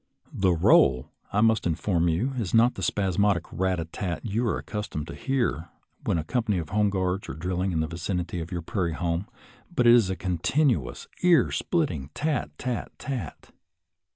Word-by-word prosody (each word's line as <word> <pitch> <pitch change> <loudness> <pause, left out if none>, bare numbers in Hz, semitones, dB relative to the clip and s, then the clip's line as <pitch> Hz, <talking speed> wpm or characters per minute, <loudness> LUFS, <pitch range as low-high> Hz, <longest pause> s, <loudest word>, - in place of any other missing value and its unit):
The 95 -1 +2
roll, 65 -6 +4 0.2
I 105 - +2
must 110 -3 +3
inform 85 +1 +1
you, 105 +12 0
is 110 -2 -1
not 120 +2 +5
the - - -7
spasmodic 95 0 +1
rat 95 -1 0
a 80 - -2
tat 85 +3 -4
you 115 +3 0
are - - 0
accustomed 105 -8 -5
to - - -6
hear 120 - -1 0.4
when - - +1
a 80 - -1
company 105 +3 0
of 80 -3 -4
home 105 +1 +2
guards 95 0 -1
are - - -4
drill 90 +3 -2
ing 95 0 0
in 80 -2 0
the 80 - -1
vicinity 90 +1 -3
of 80 - -7
your 85 -2 -3
prairie 85 -1 -1
home, 85 +3 -2 0.4
but 125 -8 +1
is 120 -4 +6
a 95 - -1
continuous, 90 - 0
ear 175 -2 +4
splitting 85 - -1
tat 150 - -1
tat^at. 125 - -5
95 Hz, 180 wpm, -26 LUFS, 85-115 Hz, 0.4 s, is